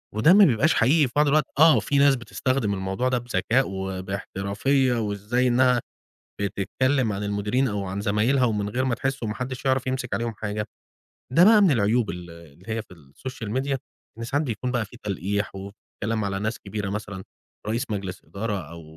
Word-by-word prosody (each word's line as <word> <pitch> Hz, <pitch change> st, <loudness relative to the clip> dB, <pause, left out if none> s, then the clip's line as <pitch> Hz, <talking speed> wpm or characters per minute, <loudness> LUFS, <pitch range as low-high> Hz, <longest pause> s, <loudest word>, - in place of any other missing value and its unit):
وده 115 Hz, +11 st, +6 dB
ما 205 Hz, +1 st, +8 dB
بيبقاش 150 Hz, +2 st, +3 dB
حقيقي 140 Hz, +5 st, +4 dB
في 125 Hz, -, -14 dB
بعض 150 Hz, 0 st, +4 dB
الوقت، 150 Hz, 0 st, +3 dB
آه، 160 Hz, +1 st, +8 dB
وفي 140 Hz, -, 0 dB
ناس 140 Hz, 0 st, +5 dB
بتستخدم 120 Hz, -2 st, -1 dB
الموضوع 95 Hz, +6 st, -1 dB
ده 125 Hz, -, +1 dB
بذكاء، 120 Hz, +2 st, +1 dB
وباحترافية، 100 Hz, +7 st, -1 dB
وازاي 105 Hz, +4 st, 0 dB
إنها 125 Hz, 0 st, +4 dB, 0.6 s
بتتكلم 110 Hz, +5 st, 0 dB
عن 100 Hz, -, -4 dB
المديرين، 105 Hz, +6 st, 0 dB
أو 100 Hz, -1 st, -3 dB
عن 95 Hz, +1 st, -4 dB
زمايلها، 110 Hz, +6 st, +2 dB
ومن 105 Hz, -3 st, 0 dB
غير 125 Hz, +5 st, -1 dB
ما 130 Hz, -3 st, +1 dB
تحس، 135 Hz, +3 st, -3 dB
وما 105 Hz, -2 st, -2 dB
حدّش 130 Hz, +1 st, -5 dB
يعرف 130 Hz, -1 st, +1 dB
يمسك 130 Hz, -1 st, -2 dB
عليهم 115 Hz, -1 st, -2 dB
حاجة، 105 Hz, 0 st, -4 dB, 0.7 s
ده 165 Hz, +6 st, +6 dB
بقى 215 Hz, 0 st, +7 dB
من 190 Hz, -, +5 dB
العيوب 115 Hz, -2 st, +2 dB
ال 90 Hz, -1 st, -7 dB
اللي 85 Hz, 0 st, -15 dB
هي 110 Hz, 0 st, -2 dB
في 100 Hz, -3 st, -16 dB
الSocial 100 Hz, -, -9 dB
Media، 135 Hz, 0 st, -1 dB, 0.4 s
إن 115 Hz, -, -5 dB
ساعات 145 Hz, +6 st, 0 dB
بيكون 125 Hz, +1 st, -3 dB
بقى 120 Hz, -3 st, 0 dB
في 120 Hz, -, -14 dB
تلقيح، 100 Hz, +1 st, -2 dB
وكلام 105 Hz, +2 st, -5 dB
على 95 Hz, -1 st, -2 dB
ناس 110 Hz, +2 st, -2 dB
كبيرة 100 Hz, -1 st, -5 dB
مثلًا، 100 Hz, -2 st, -5 dB, 0.4 s
رئيس 115 Hz, +5 st, -2 dB
مجلس 100 Hz, -3 st, -4 dB
إدارة، 105 Hz, 0 st, -3 dB
أو 85 Hz, 0 st, -10 dB
115 Hz, 185 wpm, -25 LUFS, 100-130 Hz, 0.7 s, ما